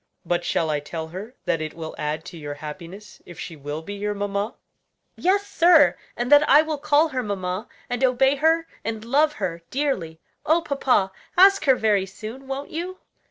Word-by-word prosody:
But 175 0 0
shall 160 -2 0
I 150 - 0
tell 160 +2 -6
her 200 +8 -8
that 165 - 0
it 155 0 -5
will 160 -1 -6
add 150 +1 -3
to 180 - -9
your 145 -1 -6
happiness 170 +7 -10
if 175 - -12
she 170 - -6
will 145 +2 -6
be 205 - -6
your 205 +1 -3
mamma?" 200 +2 -2 0.6
"Yes, 395 +3 +1
sir; 335 -5 +5 0.2
and 240 +2 -2
that 290 0 +7
I 295 +3 +7
will 310 -2 -3
call 305 +2 +3
her 260 -3 -2
mamma, 195 -1 -3 0.2
and 245 +1 -2
obey 265 +2 +3
her 325 +3 +3 0.2
and 220 -1 -4
love 295 +5 +3
her 170 - -4
dearly. 220 - -2 0.2
Oh, 325 +2 +2
papa, 260 -10 +1 0.3
ask 395 +2 +6
her 265 -2 +6
very 205 -5 +1
soon, 230 +7 -9
won't 270 +1 -5
you?" 360 +3 -4
220 Hz, 190 wpm, -24 LUFS, 175-290 Hz, 0.6 s, that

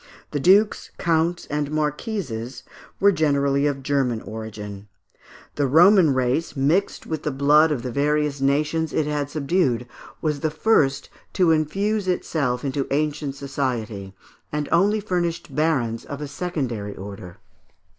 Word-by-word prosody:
The 145 - -1
dukes, 200 +8 +3
counts, 165 +1 0
and 150 -1 -2
marquises 150 - -3 0.4
were 200 +1 +5
generally 140 -4 +2
of 135 -2 -3
German 130 -4 0
origin. 105 -2 -8 0.7
The 145 -1 +2
Roman 175 +3 +6
race, 130 +5 0
mixed 155 +9 +1
with 155 -2 -4
the - - -2
blood 150 +3 +4
of 130 -6 -2
the 125 - -3
various 145 +1 0
nations 150 +3 +1
it 155 - +1
had 145 -1 -2
subdued, 140 -5 0 0.3
was 150 -2 -1
the 155 - 0
first 150 -5 +1 0.2
to 180 -4 +3
infuse 195 +7 0
itself 145 -8 -1
into 135 0 -1
ancient 145 -1 -1
Society, 120 -8 -4 0.4
and 150 -1 -2
only 205 +5 +3
furnished 175 -7 -2
barons 135 -8 0
of 140 - -7
a 150 - -5
secondary 135 - -4
order. 95 -2 -9
145 Hz, 135 wpm, -23 LUFS, 130-160 Hz, 0.7 s, Roman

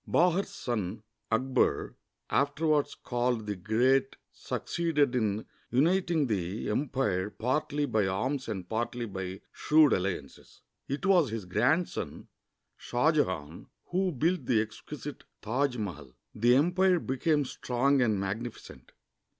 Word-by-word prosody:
Bahar's 180 +3 +3
son 110 -3 -3 0.3
Akbar, 130 +3 +1 0.4
afterv^ 145 +3 +2
ards 145 0 -2
called 120 -2 -1
the 105 -1 -3
Great, 125 +8 +2 0.2
succeeded 150 -6 -1
in 110 -3 0 0.2
uniting 165 +4 +2
the 100 -2 -2
empire 105 -7 0
partly 145 +6 -1
by 110 -7 +1
arms 130 +9 -1
and 95 -5 -4
partly 120 +2 -2
by 95 -2 -6
shrewd 155 -1 +4
alliances. 90 -7 -4 0.3
It 140 +6 -3
was 180 -7 +4
his 110 -3 -4
grandson, 125 - 0 0.5
Shah 125 +6 +1
Jehan, 90 - -2 0.2
who 185 +1 +1
built 160 0 0
the 115 - +3
exquisite 140 +7 -6 0.2
Taj 125 +3 0
Mahal. 75 - -6 0.2
The 120 +3 +4
empire 180 +5 +4
became 145 +2 +1
strong 130 +2 +1
and 110 -5 +2
magnificent. 100 - -6
125 Hz, 120 wpm, -29 LUFS, 105-145 Hz, 0.5 s, shrewd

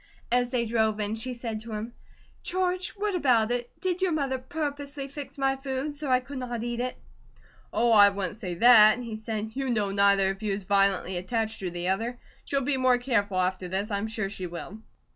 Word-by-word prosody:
As 245 0 +2
they 245 -2 0
drove 220 -1 +1
in 210 0 -1
she 245 +3 -4
said 230 -2 -4
of 230 - -10
him: 220 +2 -5 0.5
"George, 365 0 -1
what 410 0 -1
about 245 -9 +3
it? 245 0 -1
Did 370 -1 -1
your 375 -2 +2
mother 275 -4 -1
purposely 285 0 -4
fix 285 +1 -8
my 270 0 +1
food 270 +2 -3
so 290 -1 -5
I 255 0 +4
could 270 +1 -7
not 240 -2 -4
eat 240 0 -3
it?" 250 +1 -2 0.8
"Oh, 235 0 +2
I 205 -2 +8
wouldn't 195 -1 -3
say 185 -6 -5
that," 220 +1 +8
he 235 -3 -5
said. 220 0 -4
"You 270 0 -2
know 210 -4 0
neither 200 -1 +4
of 195 +2 -9
you 210 -2 -1
is 200 0 -4
violently 195 -1 +2
attached 220 +4 -2
to 185 - -3
the 175 +1 -3
other. 225 +6 -1 0.3
She'll 275 -1 0
be 270 +1 0
more 255 -1 +4
careful 215 -6 0
after 185 0 0
this, 195 +4 -2
I'm 200 +2 -1
sure 220 -3 -2
she 190 -2 -6
will." 175 +4 -8
230 Hz, 210 wpm, -27 LUFS, 200-265 Hz, 0.8 s, I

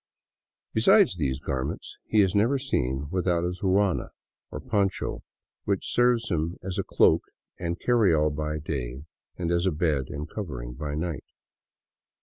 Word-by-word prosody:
Besides 125 - +5
these 70 -6 -1
garments, 65 -1 -4
he 110 - +4
is 95 -2 +2
never 115 +7 +3
seen 70 - -1
without 90 -2 +1
his 90 +2 -3
ruana, 95 -1 +2 0.4
or - - -6
poncho, 100 -5 -1 0.4
which 100 -2 -1
serves 120 -3 +3
him 85 +1 -1
as 95 -1 -3
a - - +1
cloak - - +4 0.4
and 85 0 -3
carry 120 -6 +3
all 75 -1 +3
by 75 +1 -3
day, 65 -3 -4 0.3
and 85 -1 -1
as 85 +2 +2
a - - +3
bed 75 -4 0
and 75 +1 -5
covering 65 - -6
by 75 +3 -4
night. 80 -1 -3
85 Hz, 150 wpm, -27 LUFS, 75-100 Hz, 0.4 s, Besides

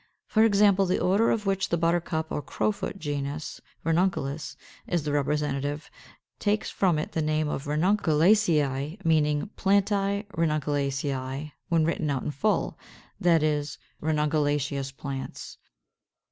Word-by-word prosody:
For 220 - +3
example, 200 -3 +4
the 180 - +1
order 200 +5 +3
of 210 -2 0
which 195 -1 0
the 170 - +1
Buttercup 165 -1 0
or - - -2
Crowfoot 200 +8 -2
genus, 145 -2 -4 0.2
Ranunculus, 165 -4 0 0.3
is 170 -3 0
the 150 - -2
representative, 145 0 -1 0.5
takes 210 +1 0
from 180 -5 +2
it 150 - -3
the 160 - -1
name 155 0 0
of 145 -1 -3
Ranunculaceæ; 160 -1 +2
meaning 155 +3 +2
Plantæ 200 +1 +1
Ranunculaceæ 145 -4 -1 0.2
when 165 -2 +3
written 160 -2 -1
out 135 -3 -1
in - - -2
full, 210 +10 0 0.4
that 170 -5 +4
is, 150 -1 -1 0.2
Ranunculaceous 145 -2 0
Plants. 135 -2 -6
155 Hz, 125 wpm, -27 LUFS, 145-190 Hz, 0.5 s, example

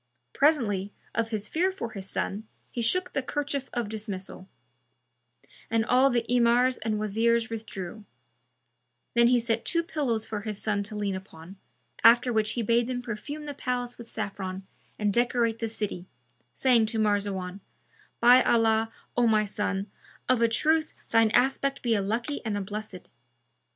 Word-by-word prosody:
Presently, 220 -10 +2 0.2
of 230 0 0
his 215 -2 -2
fear 365 +4 +1
for 375 -12 -6
his 195 -2 -6
son, 210 +3 -3 0.2
he 240 - -3
shook 365 +11 +1
the 275 - 0
kerchief 280 0 -3
of 240 -3 -2
dismissal[FN#293]; 205 -3 -5 1.2
and 225 -1 +1
all 255 +3 +4
the 240 -2 0
Emirs 245 +1 +3
and 220 -1 -1
Wazirs 225 +2 +1
withdrew; 215 -2 -6 1.1
then 235 0 +5
he 245 0 +4
set 230 -1 -1
two 335 0 +1
pillows 265 -10 -1
for 210 -2 -4
his 210 -1 -4
son 210 -2 0
to 210 +2 -7
lean 205 -2 -1
upon, 190 -1 -10 0.5
after 240 +1 +6
which 215 -1 +1
he 235 - -1
bade 235 +2 +2
them 250 -1 -3
perfume 255 +7 -6
the 290 - -5
palace 245 -2 -3
with 235 - -10
saffron 190 -1 -5 0.3
and 205 -1 0
decorate 235 -1 +1
the 225 - -2
city, 205 -5 -4 0.5
saying 240 -4 +3
to 225 - -2
Marzawan, 200 -3 0 0.6
"By 245 +2 +7
Allah, 225 -2 +3 0.3
O 245 -1 +3
my 215 -1 +3
son, 200 -1 -2 0.4
of 255 -2 +3
a 230 - +5
truth 310 +7 +1 0.2
shine 225 -1 +5
aspect 270 +4 +1
be 235 -2 +2
a 205 - +2
lucky 230 +8 -2
and 215 -3 -2
a - - -2
blessed!" 205 -2 -7
225 Hz, 160 wpm, -27 LUFS, 210-245 Hz, 1.2 s, By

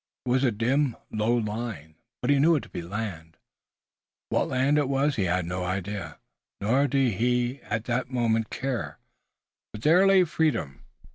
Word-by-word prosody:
It - - -3
was 130 +2 +2
a 130 - +4
dim 125 +5 +1 0.2
low 110 +2 +1
line, 105 -8 -4 0.3
but 125 - +2
he 140 - +4
knew 165 +4 +5
it 145 - -1
to - - -13
be - - -5
land. 85 -3 -6 0.9
What - - +1
land 135 +3 +2
it 140 -2 0
was 140 +1 +1
he 100 - 0
had 90 0 0
no 90 +1 -3
idea, 95 +2 -4 0.4
nor 130 +8 +2
did 130 -7 +1
he 125 +2 0
at 110 0 -2
the 125 +1 0
moment 115 -3 0
care, 130 -4 -3 0.7
but 105 - -9
there 180 +5 +5
lay 195 -1 +6
freedom. 155 - -1
120 Hz, 170 wpm, -26 LUFS, 105-135 Hz, 0.9 s, lay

